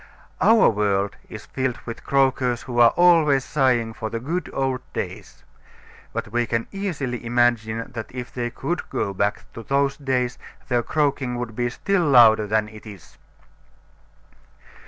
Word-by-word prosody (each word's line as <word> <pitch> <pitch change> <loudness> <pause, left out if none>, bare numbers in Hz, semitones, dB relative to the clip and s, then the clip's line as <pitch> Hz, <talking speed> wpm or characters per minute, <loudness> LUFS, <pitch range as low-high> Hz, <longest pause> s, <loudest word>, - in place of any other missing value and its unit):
Our 225 0 +6
world 100 -2 0
is - - -9
filled 130 -2 -2
with 115 - -7
croakers 130 -3 +1
who 120 -1 -3
are 120 -1 +8
always 160 -6 +4
sighing 125 -6 +1
for 110 0 -5
the 115 - -4
good 165 +9 -3
old 130 -1 -1
days. - - -6 0.7
But - - -4
we 120 0 0
can 115 0 -1
easily 150 -12 -4
imagine 115 -1 0
that 115 -3 -5
if 125 -1 -7
they 120 -1 -2
could 165 +8 -4
go 100 -2 -2
back 100 +2 -1
to 115 - -8
those 140 +3 0
days 125 -3 -1 0.3
their 120 -2 +2
croaking 140 -2 -1
would 120 -2 -5
be 120 +1 0
still 195 +9 0
louder 115 -7 +6
than 110 0 +1
it 110 +1 -13
is. 100 -7 -13
120 Hz, 155 wpm, -23 LUFS, 115-135 Hz, 0.7 s, are